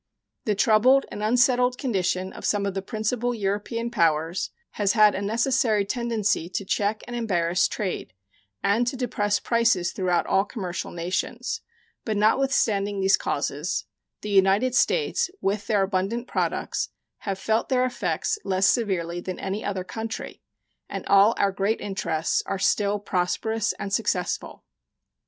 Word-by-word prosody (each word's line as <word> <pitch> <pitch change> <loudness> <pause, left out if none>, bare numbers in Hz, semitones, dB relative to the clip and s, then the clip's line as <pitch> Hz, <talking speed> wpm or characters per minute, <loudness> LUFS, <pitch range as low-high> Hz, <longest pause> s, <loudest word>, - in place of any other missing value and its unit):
The 210 - +1
troubled 235 +6 +4
and 210 - -6
unsettled 250 +2 +3
condition 190 -7 -1
of - - -10
some 205 -1 +1
of 200 - -1
the 195 - -2
principal 230 +4 -2
European 215 +3 -2
powers 165 -3 +1 0.2
has 205 -2 +1
had 215 -2 +6
a 190 - -3
necessary 225 0 +1
tendency 215 -5 -1
to 190 +1 -3
check 205 +2 0
and 245 - -6
embarrass 180 -7 +1
trade 190 - -4 0.5
and 230 +4 +2
to 260 - -2
depress 205 -5 0
prices 230 -7 +2
throughout 180 -3 0
all 195 - +3
commercial 190 -4 -5
nations, 175 +2 -3 0.4
but 215 -2 -2
notwithstanding 210 -3 +2
these 195 +1 +4
causes, - - -2 0.4
the 210 - -5
United 200 +6 +4
States, 435 - +2
with 200 +1 -1
their 205 -3 +3
abundant 195 +5 -1
products, - - -1 0.3
have 195 -2 -3
felt 220 +3 0
their 255 -1 +3
effects 255 - -1
less 190 0 +1
severely 180 -6 +1
than 185 0 -5
any 195 +2 -3
other 190 -2 -2
country, 220 +4 -6 0.5
and - - -5
all 200 +3 +5
our 200 - +2
great 200 +3 0
interests 170 -5 -1
are 195 - -1
still 205 +2 +2
prosperous 205 +3 -1
and 195 - -6
successful. 185 -5 -1
205 Hz, 145 wpm, -25 LUFS, 190-230 Hz, 0.5 s, had